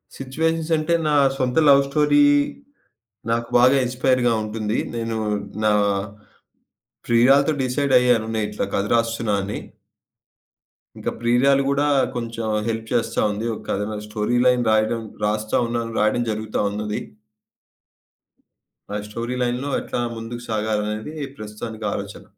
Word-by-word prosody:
Situations 160 +4 -2
అంటే, 155 +2 0
నా 150 - +2 0.2
సొంత 125 +2 -1
లవ్ 140 0 +7
స్టోరీ 150 - +4 1.1
నాకు 115 0 0
బాగా 130 +3 +5
ఇన్‌స్పైర్‌గా 125 -1 +1
ఉంటుంది. 110 0 -2 0.2
నేను 115 -1 -2 0.5
నా 105 - +4 1.4
ప్రియురాలుతో 135 +6 +4
డిసైడ్ 135 +2 0
అయ్యాను. 125 -3 +2
నేను 105 -1 -1
ఇట్లా 105 - -2
కథ 100 - +1
రాస్తున్నా 115 -2 0
అని. 100 +2 -4 1.4
ఇంకా - - -3
ప్రియురాలు 130 +4 +3
గూడా 140 +1 +1 0.3
కొంచెం 115 -1 -4 0.2
హెల్ప్ 115 0 -3
చేస్తా 115 - 0
ఉంది. 105 +2 -4
ఒక - - -10
కథను 105 +2 -2
స్టోరీ 105 +3 -1
లైన్ 125 -1 +4
రాయడం 110 +1 +1 0.2
రాస్తా 105 +1 0
ఉన్నాను, 115 -1 -3
రాయడం 110 +3 +2
జరుగుతా 110 0 -2
ఉన్నది. 105 0 -3 2.0
ఆ - - 0
స్టోరీ 115 +4 -4
లైన్‌లో 125 +3 -1
ఎట్లా - - -3 0.2
ముందుకు 115 +1 -6
సాగాలనేది 110 +3 -2 0.2
ప్రస్తుతానికి 110 +1 -7
ఆలోచన. - - -6
115 Hz, 120 wpm, -22 LUFS, 110-130 Hz, 2.0 s, లవ్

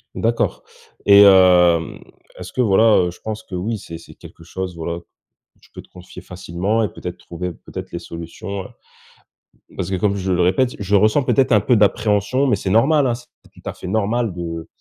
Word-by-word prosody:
D'accord. 115 +1 -1 0.4
Et, 100 0 +8
hem, 90 -4 +5 0.4
est-ce 90 0 -9
que, 130 - 0
voilà 110 0 +4
heu, - - -4
je 90 - -16
pense 110 0 -6
que 95 - -8
oui 105 +6 -3
c'est 85 -4 -9
c'est 85 - -15
quelque - - -15
chose, 90 +1 -6
voilà, 85 +1 -4 0.6
tu - - -24
peux - - -10
te - - -24
confier 90 0 -13
facilement 95 +4 -2
et 105 - -1
peut-être 90 -1 -8
trouver, 90 +1 -6
peut-être, - - -10
les 85 - -5
solutions, 85 +4 -7
heu. - - -10 1.1
Parce 95 -1 -3
que, 95 - -1
comme 100 +2 0
je 95 -1 -3
le 90 0 +1
répète, 95 +9 +1
je 100 0 0
ressens 110 +7 +3
peut-être 130 0 +2
un 105 - +5
peu 125 +4 +2
d'appréhension, 105 +4 +1
mais 125 - +3
c'est 95 - -4
normal, 135 +7 +3
hein. 120 - 0
C'est 120 +1 -14 0.3
tout - - -18
à - - -4
fait - - -10
normal 110 +2 -1
de 85 -2 -6
95 Hz, 205 wpm, -20 LUFS, 90-110 Hz, 1.1 s, Et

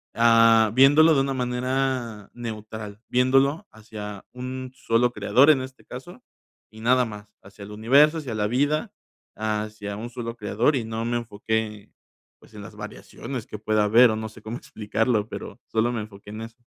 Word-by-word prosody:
ah, 115 -1 +5
viéndolo 145 +6 +6
de 135 - +3
una 135 0 -1
manera 125 -3 -2
neutral, 110 -3 -7
viéndolo 135 +8 +2
hacia 105 -2 -9
un 130 0 -6
solo 120 -1 +1
creador 135 +3 +4
en 135 -4 +2
este 130 0 -10
caso, 125 +2 -10 0.5
y 110 0 -13
nada 125 +2 +3
más, 105 -2 -9 0.2
hacia 100 +1 -13
el 100 - -10
universo, 140 +9 +4
hacia 135 -7 -5
la 105 -1 0
vida, 145 - 0 0.4
hacia 105 -1 -3
un 115 +3 -6
solo 120 -1 -6
creador, 115 +6 +1
y 125 - -1
no 110 +1 -4
me 120 0 0
enfoqué, 110 -1 -3 0.5
pues, - - -21
en - - -8
las - - -11
variaciones 125 -5 -7
que 105 - -8
pueda 110 0 +1
haber 115 +4 +6
o - - -1
no 110 0 -5
sé 110 +1 -15
cómo 110 +3 -6
explicarlo, 110 0 -1
pero 110 - -8
solo 115 +2 +1
me 115 -2 -3
enfoqué 105 -1 -11
en 110 - -7
eso. 115 +2 -11
115 Hz, 175 wpm, -24 LUFS, 110-130 Hz, 0.5 s, viéndolo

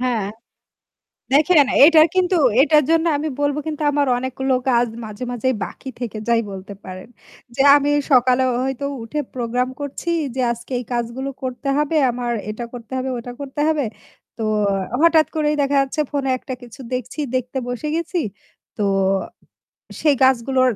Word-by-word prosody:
হ্যাঁ। 245 -5 0 1.1
দেখেন 300 0 +5 0.2
এটা 320 +1 +7
কিন্তু 370 0 +2 0.2
এটার 300 +1 +5
জন্য 330 0 +3
আমি 310 +2 -2
বলবো 290 0 +1
কিন্তু 310 -1 -4
আমার 285 0 +2
অনেক 260 +1 -4
গুলো 265 0 +2 0.2
কাজ 240 -1 +3 0.2
মাঝে, 215 +3 -6
মাঝে 245 +1 -1 0.2
বাকি 270 - -9
থেকে 230 -3 -4
যাই 235 -1 +4
বলতে 195 +1 -8
পারেন। 185 +3 -9 0.5
যে - - -5 0.2
আমি 290 0 +1 0.2
সকালে 255 0 +4 0.2
হয়তো 265 +1 -3 0.2
উঠে 230 +7 -3
প্রোগ্রাম 250 +1 -1
করছি 285 +4 -5 0.3
যে 260 - -2
আজকে 235 +2 -10
এই 245 - -5
কাজগুলো 240 +3 -3
করতে 260 +2 -4
হবে। 300 +2 0
আমার 240 0 -3 0.2
এটা 225 +3 -5
করতে 240 0 -10
হবে, 260 +1 -2
ওটা 245 +1 -7
করতে 280 +1 -5
হবে। 305 -3 +1 0.5
তো - - -3 0.6
হঠাৎ 325 -3 +5
করেই 300 -1 +1
দেখা 280 0 +1
যাচ্ছে 275 +3 -3
ফোনে 275 -2 -1
একটা 260 - -6
কিছু 245 +3 -12
দেখছি 250 +4 -4
দেখতে 255 +1 -2
বসে 245 +5 -3
গেছি। 335 +2 -2 0.6
তো 210 - -2 1.2
সেই 300 -3 +4
কাজগুলো 260 0 +3
265 Hz, 160 wpm, -20 LUFS, 245-295 Hz, 1.2 s, এটা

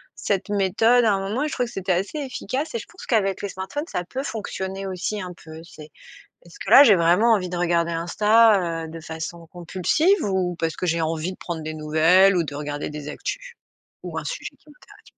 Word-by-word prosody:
cette 200 0 -2
méthode 210 +5 +3
à 215 - +4
un 195 - 0
moment 225 +8 -2
et - - 0
je 305 - -5
trouvais 250 -5 -1
que - - -11
c'était 185 -1 -1
assez 195 - -2
efficace. 265 0 -4
Et - - 0
je - - -9
pense 355 - -12
qu'avec 195 -5 0
les 205 - -3
smartphones, 285 - -5
ça 180 - -3
peut 260 +9 -5
fonctionner 195 -5 -5
aussi 190 +3 -3
un 180 -1 -6
peu. 160 0 -10
C'est 155 -3 -13 0.6
est-ce 170 - -16
que, 195 - -4
là, 275 - +10
j'ai 215 -6 +7
vraiment 180 +7 +4
envie 185 -4 0
de 175 - -4
regarder 170 -1 +1
Insta, 185 0 +3
heu, - - -8
de 165 +1 -9
façon 165 +1 -7
compulsive, 190 - +1
ou 185 -3 -1
parce 165 -1 -2
que - - -3
j'ai 165 -1 0
envie 160 +2 -2
de - - -15
prendre 170 -2 -5
des 155 0 -5
nouvelles 160 +5 +4
ou 170 - +2
de 145 -2 -7
regarder 145 0 -4
des 150 0 -7
actus, - - -6 0.5
ou - - -7
un - - -3
sujet - - -6
qui - - -24
m'intéresse? 295 - -19
185 Hz, 225 wpm, -23 LUFS, 165-225 Hz, 0.6 s, là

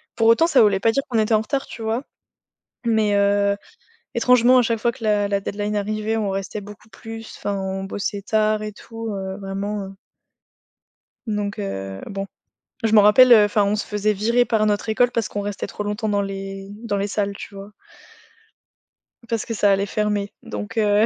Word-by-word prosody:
Pour 225 -1 +2
autant, 230 +8 +6
ça 270 -8 +5
voulait 200 -3 +4
pas 225 - +3
dire 275 +4 +1
qu'on 235 - 0
était 215 +1 +2
en 215 - +4
retard, 270 +5 -2
tu 230 - -10
vois? 225 +4 -1 0.8
Mais, 220 -2 +2
heu, 200 0 +3 0.6
étrangement, 250 +1 +5
à - - +5
chaque 230 -1 0
fois 235 - +1
que 230 - -12
la 205 -1 +2
la 200 0 0
deadline 205 +1 -3
arrivait, 215 +2 -1
on 205 -2 -1
restait 195 +2 -4
beaucoup 210 +1 -12
plus. 225 0 -9
Enfin, 205 - -2
on 190 0 -3
bossait 200 +1 -3
tard 215 +1 +1
et 210 - -4
tout, 225 +2 -8
heu, 190 0 -5
vraiment 195 +1 -4
heu 195 - -12 1.3
Donc 205 -1 -2
heu, 95 0 -5
bon. 195 0 -4 0.6
Je 220 - +2
m'en 210 -2 +7
rappelle, 245 +4 +7
heu, 215 -2 +8
enfin, 205 0 +2
on 200 +1 +1
se - - -2
faisait 210 0 0
virer 230 +5 +2
par 220 -3 +1
notre 210 +1 0
école 245 +3 +3
parce 230 -3 -1
qu'on 205 - -4
restait 205 -1 -4
trop 210 - -6
longtemps 210 +1 -2
dans 205 -1 +1
les 195 0 -6 0.2
dans 205 -3 -1
les 200 +1 -1
salles, 200 -1 -1
tu 200 - -9
vois? 200 +1 -10 1.6
Parce 230 -2 -1
que 230 - -4
ça 205 -2 +3
allait 195 0 +2
fermer. 205 -1 -1
Donc 225 +2 -6
heu 210 0 +4
210 Hz, 200 wpm, -22 LUFS, 200-225 Hz, 1.6 s, heu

